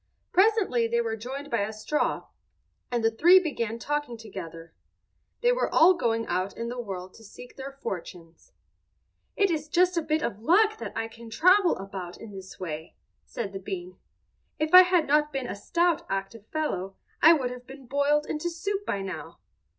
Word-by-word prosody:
Presently 380 Hz, -, +3 dB
they 235 Hz, +1 st, 0 dB
were 225 Hz, -1 st, -1 dB
joined 265 Hz, +6 st, -7 dB
by 235 Hz, -, +1 dB
a 205 Hz, +2 st, -2 dB
straw, 220 Hz, +8 st, -1 dB, 0.6 s
and 240 Hz, -2 st, -1 dB
the 225 Hz, -, +3 dB
three 345 Hz, +11 st, +6 dB
began 235 Hz, -10 st, -3 dB
talking 290 Hz, -1 st, -3 dB
together. 165 Hz, -7 st, -9 dB, 0.7 s
They 485 Hz, 0 st, +4 dB
were -, -, 0 dB
all 345 Hz, +3 st, +7 dB
going 230 Hz, -9 st, 0 dB
out 185 Hz, +2 st, -2 dB
in 235 Hz, 0 st, -4 dB
the 245 Hz, 0 st, -4 dB
world 185 Hz, -4 st, -7 dB
to 225 Hz, -, -16 dB
seek 245 Hz, +3 st, -13 dB
their 270 Hz, +1 st, -7 dB
fortunes. 180 Hz, -, -8 dB, 0.8 s
"It 395 Hz, -3 st, +2 dB
is 305 Hz, -2 st, -2 dB
just 360 Hz, +2 st, +3 dB
a -, -, +3 dB
bit 310 Hz, 0 st, -1 dB
of 205 Hz, -, -3 dB
luck 425 Hz, -, +3 dB
that -, -, -6 dB
I 225 Hz, 0 st, -1 dB
can 230 Hz, 0 st, -12 dB
travel 365 Hz, -, +4 dB
about 190 Hz, -2 st, -7 dB
in 225 Hz, -, -10 dB
this 190 Hz, -1 st, -10 dB
way," 160 Hz, -3 st, -6 dB, 0.3 s
said 205 Hz, -4 st, -5 dB
the 195 Hz, -, -5 dB
bean. 185 Hz, -2 st, -7 dB, 0.6 s
"If 310 Hz, +2 st, -2 dB
I 365 Hz, -, +12 dB
had 360 Hz, -3 st, +3 dB
not 300 Hz, +1 st, +2 dB
been 270 Hz, -2 st, -3 dB
a -, -, -4 dB
stout 335 Hz, +11 st, +1 dB
active 195 Hz, +3 st, -4 dB
fellow 195 Hz, -12 st, -3 dB, 0.3 s
I 325 Hz, +2 st, +9 dB
would 260 Hz, -6 st, -1 dB
have 250 Hz, 0 st, -10 dB
been 270 Hz, 0 st, -11 dB
boiled 285 Hz, +3 st, +1 dB
into 310 Hz, +3 st, -3 dB
soup 395 Hz, +4 st, -3 dB
by 200 Hz, -1 st, -1 dB
now. 185 Hz, -5 st, -7 dB
245 Hz, 185 wpm, -27 LUFS, 200-315 Hz, 0.8 s, I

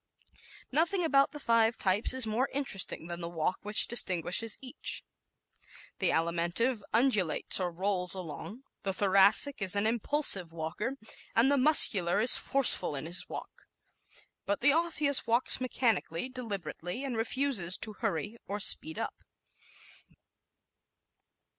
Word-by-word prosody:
¶ -, -, -29 dB, 0.4 s
Nothing 345 Hz, +6 st, 0 dB
about 275 Hz, -2 st, +2 dB
the 295 Hz, -, -9 dB
five 230 Hz, -3 st, +2 dB
types 195 Hz, +3 st, +1 dB
is 260 Hz, -2 st, +3 dB
more 225 Hz, +5 st, -2 dB
interesting 255 Hz, -, -1 dB
than 170 Hz, 0 st, -8 dB
the 170 Hz, -, -5 dB
walk 170 Hz, +1 st, -3 dB
which 210 Hz, +1 st, +3 dB
distinguishes 190 Hz, 0 st, +1 dB
each. 265 Hz, +2 st, -4 dB, 1.0 s
The -, -, +1 dB
Alimentive 175 Hz, +9 st, -1 dB
undulates 215 Hz, -, +2 dB
or 180 Hz, -1 st, -3 dB
rolls 180 Hz, +1 st, -1 dB
along; 185 Hz, -, -9 dB, 0.2 s
the 195 Hz, -, -3 dB
Thoracic 200 Hz, +7 st, +3 dB
is 195 Hz, 0 st, +1 dB
an 200 Hz, +1 st, 0 dB
impulsive 225 Hz, -, +1 dB
walker, 170 Hz, +11 st, -5 dB, 0.4 s
and 240 Hz, +5 st, +3 dB
the -, -, +3 dB
Muscular 205 Hz, -, +4 dB
is 235 Hz, +3 st, +10 dB
forceful 255 Hz, -, +1 dB
in 140 Hz, +2 st, -6 dB
his 175 Hz, +2 st, -5 dB
walk. -, -, -10 dB, 0.8 s
But 200 Hz, 0 st, -2 dB
the 280 Hz, +3 st, +4 dB
Osseous 310 Hz, -4 st, 0 dB
walks 235 Hz, +3 st, +2 dB
mechanically, 240 Hz, -6 st, -2 dB
deliberately, 205 Hz, -, -7 dB
and 265 Hz, -3 st, -5 dB
refuses 225 Hz, -6 st, 0 dB
to 215 Hz, -, -6 dB
hurry 185 Hz, +3 st, -4 dB
or 205 Hz, +1 st, -5 dB
speed 160 Hz, -5 st, 0 dB
up. -, -, -6 dB
215 Hz, 135 wpm, -29 LUFS, 180-260 Hz, 1.0 s, is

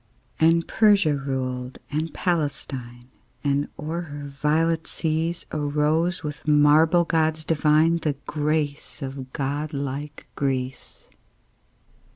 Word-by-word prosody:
And 165 Hz, +1 st, +4 dB
Persia 200 Hz, -9 st, +4 dB
ruled 130 Hz, -2 st, -3 dB
and 155 Hz, +2 st, -1 dB
Palestine; 135 Hz, -7 st, -3 dB, 0.3 s
And 140 Hz, 0 st, +1 dB
o'er 160 Hz, +3 st, -3 dB
her 145 Hz, -3 st, -7 dB
violet 160 Hz, +3 st, +1 dB
seas 165 Hz, +2 st, -2 dB
Arose, 155 Hz, +4 st, +1 dB
with 150 Hz, 0 st, -6 dB
marble 155 Hz, +3 st, +5 dB
gods 160 Hz, -1 st, +1 dB
divine, 155 Hz, +1 st, +3 dB
The 155 Hz, -3 st, -1 dB
grace 150 Hz, -1 st, -2 dB
of 135 Hz, -1 st, -6 dB
god 145 Hz, +3 st, -3 dB
like 140 Hz, +1 st, -5 dB
Greece. 130 Hz, -2 st, -3 dB
150 Hz, 105 wpm, -24 LUFS, 140-160 Hz, 0.3 s, marble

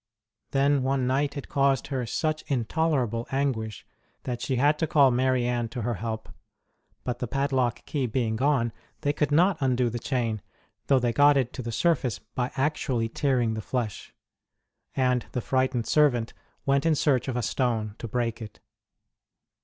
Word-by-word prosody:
Then 140 Hz, 0 st, +2 dB
one 130 Hz, 0 st, +1 dB
night 140 Hz, +3 st, 0 dB
it 140 Hz, -, -6 dB
caused 135 Hz, -1 st, +2 dB
her 130 Hz, -4 st, -2 dB
such 155 Hz, +6 st, -1 dB
intolerable 125 Hz, -3 st, 0 dB
anguish 125 Hz, -6 st, -2 dB, 0.4 s
that 120 Hz, -2 st, -4 dB
she 130 Hz, -, -1 dB
had 145 Hz, +4 st, +3 dB
to 160 Hz, -, +1 dB
call 140 Hz, -3 st, +5 dB
Marianne 125 Hz, -2 st, +1 dB
to 120 Hz, 0 st, -5 dB
her 120 Hz, +1 st, 0 dB
help; 110 Hz, +1 st, -4 dB, 0.8 s
but, 125 Hz, -1 st, -3 dB
the 125 Hz, -, -2 dB
padlock 130 Hz, -1 st, 0 dB
key 140 Hz, -4 st, -1 dB
being 115 Hz, -1 st, -1 dB
gone, 125 Hz, -2 st, +1 dB, 0.3 s
they 145 Hz, -, +1 dB
could 150 Hz, -1 st, 0 dB
not 175 Hz, +4 st, +4 dB
undo 125 Hz, -3 st, +1 dB
the 120 Hz, -, -3 dB
chain, 115 Hz, -5 st, -1 dB, 0.5 s
though 135 Hz, -, +5 dB
they 120 Hz, -2 st, +1 dB
got 145 Hz, +1 st, +5 dB
it 130 Hz, -3 st, 0 dB
to 130 Hz, -, -5 dB
the 115 Hz, -1 st, -4 dB
surface 130 Hz, -2 st, +1 dB
by 125 Hz, 0 st, -4 dB
actually 130 Hz, -5 st, 0 dB
tearing 125 Hz, -3 st, +1 dB
the 110 Hz, -, -3 dB
flesh; 115 Hz, -3 st, -4 dB, 0.8 s
and 125 Hz, -2 st, +1 dB
the -, -, 0 dB
frightened 130 Hz, -1 st, 0 dB
servant 125 Hz, -7 st, +2 dB, 0.3 s
went 140 Hz, 0 st, +2 dB
in 165 Hz, -1 st, +3 dB
search 140 Hz, -4 st, +2 dB
of 130 Hz, -, -2 dB
a 120 Hz, -, -1 dB
stone 110 Hz, -4 st, 0 dB
to 115 Hz, -, -5 dB
break 115 Hz, 0 st, -2 dB
it. 110 Hz, -1 st, -9 dB
130 Hz, 170 wpm, -27 LUFS, 120-140 Hz, 0.8 s, call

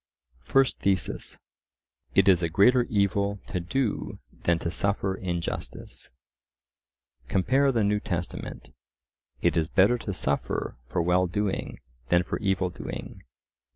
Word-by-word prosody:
First 135 Hz, -, +2 dB
Thesis:— 95 Hz, -4 st, -1 dB, 0.8 s
It -, -, +5 dB
is 90 Hz, -3 st, +6 dB
a 85 Hz, -, 0 dB
greater 120 Hz, +8 st, +5 dB
evil 100 Hz, -1 st, +1 dB
to 90 Hz, -, -3 dB
do 110 Hz, +7 st, -2 dB, 0.3 s
than 85 Hz, -1 st, +4 dB
to 85 Hz, 0 st, -3 dB
suffer 100 Hz, +1 st, 0 dB
injustice. 85 Hz, -3 st, -5 dB, 1.2 s
Compare 135 Hz, -, +3 dB
the 115 Hz, -4 st, +1 dB
New 105 Hz, +1 st, +2 dB
Testament— 85 Hz, -8 st, -5 dB, 0.7 s
"It 85 Hz, -, +3 dB
is 80 Hz, -1 st, +1 dB
better 105 Hz, +7 st, +4 dB
to 105 Hz, -, -4 dB
suffer 70 Hz, -6 st, -2 dB
for 85 Hz, +6 st, 0 dB
well 90 Hz, +2 st, +3 dB
doing 100 Hz, +2 st, -2 dB, 0.3 s
than 85 Hz, 0 st, +4 dB
for -, -, -3 dB
evil 95 Hz, -3 st, 0 dB
doing." -, -, -7 dB
95 Hz, 125 wpm, -27 LUFS, 85-105 Hz, 1.2 s, is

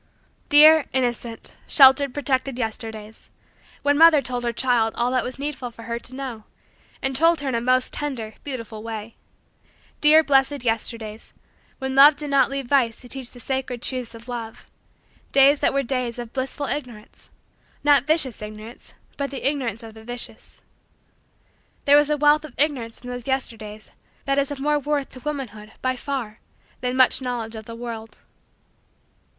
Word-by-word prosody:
Dear, 305 Hz, +1 st, +8 dB
innocent, 240 Hz, -3 st, -2 dB
sheltered, 270 Hz, 0 st, +6 dB
protected, 265 Hz, -1 st, -1 dB
Yesterdays 220 Hz, -2 st, -6 dB, 0.5 s
when 285 Hz, +1 st, +2 dB
mother 325 Hz, -2 st, +8 dB
told 245 Hz, -2 st, -4 dB
her 240 Hz, -, 0 dB
child 235 Hz, -2 st, +1 dB
all 240 Hz, +1 st, 0 dB
that 255 Hz, -2 st, +1 dB
was 255 Hz, -, -6 dB
needful 275 Hz, -3 st, -4 dB
for 230 Hz, -1 st, -13 dB
her 235 Hz, +1 st, -4 dB
to 250 Hz, +2 st, -8 dB
know, 255 Hz, -5 st, -6 dB, 0.6 s
and 270 Hz, 0 st, -1 dB
told 330 Hz, +2 st, +3 dB
her 280 Hz, -, -2 dB
in -, -, -2 dB
a 230 Hz, -, 0 dB
most 255 Hz, +1 st, +1 dB
tender, 245 Hz, -7 st, -4 dB
beautiful, 230 Hz, -6 st, -6 dB
way. 225 Hz, 0 st, -7 dB, 0.8 s
Dear, 310 Hz, +1 st, +6 dB
blessed, 275 Hz, -2 st, +2 dB
Yesterdays 225 Hz, -1 st, -3 dB, 0.4 s
when 265 Hz, -1 st, -4 dB
love 285 Hz, +2 st, +8 dB
did 290 Hz, 0 st, -6 dB
not 275 Hz, -1 st, +4 dB
leave 275 Hz, -1 st, -4 dB
vice 240 Hz, -3 st, +1 dB
to 250 Hz, -, -11 dB
teach 260 Hz, -1 st, -3 dB
the 245 Hz, -, -15 dB
sacred 255 Hz, -1 st, -4 dB
truths 250 Hz, -3 st, -3 dB
of 230 Hz, +1 st, -13 dB
love 230 Hz, -2 st, -7 dB, 0.6 s
days 275 Hz, +1 st, +5 dB
that -, -, +2 dB
were 275 Hz, 0 st, 0 dB
days 250 Hz, -2 st, -2 dB
of 240 Hz, -2 st, -7 dB
blissful 270 Hz, +2 st, -2 dB
Ignorance 245 Hz, -7 st, -7 dB, 0.5 s
not 285 Hz, -2 st, +4 dB
vicious 305 Hz, -8 st, +1 dB
Ignorance 215 Hz, +3 st, -10 dB, 0.2 s
but 280 Hz, -1 st, -3 dB
ignorance 265 Hz, -5 st, -2 dB
of 225 Hz, -1 st, -10 dB
the 220 Hz, 0 st, -13 dB
vicious. 245 Hz, +1 st, -6 dB, 1.2 s
There 285 Hz, -, +6 dB
was 295 Hz, 0 st, +4 dB
a 300 Hz, -, +1 dB
wealth 295 Hz, +1 st, +4 dB
of 300 Hz, -5 st, -11 dB
Ignorance 265 Hz, -6 st, 0 dB
in 250 Hz, -, -9 dB
those 245 Hz, 0 st, -7 dB
Yesterdays 220 Hz, -5 st, -4 dB, 0.3 s
that 275 Hz, 0 st, +1 dB
is 280 Hz, -, 0 dB
of 285 Hz, -2 st, -6 dB
more 295 Hz, +2 st, +1 dB
worth 290 Hz, -1 st, -2 dB
to 255 Hz, -, -12 dB
womanhood, 245 Hz, -7 st, -6 dB
by 255 Hz, 0 st, +1 dB
far, 250 Hz, -5 st, -5 dB, 0.4 s
than 250 Hz, 0 st, -2 dB
much 260 Hz, +1 st, +4 dB
knowledge 240 Hz, -3 st, -4 dB
of 220 Hz, -1 st, -8 dB
the 230 Hz, -, -8 dB
world. 230 Hz, -2 st, -7 dB
255 Hz, 165 wpm, -23 LUFS, 230-280 Hz, 1.2 s, Dear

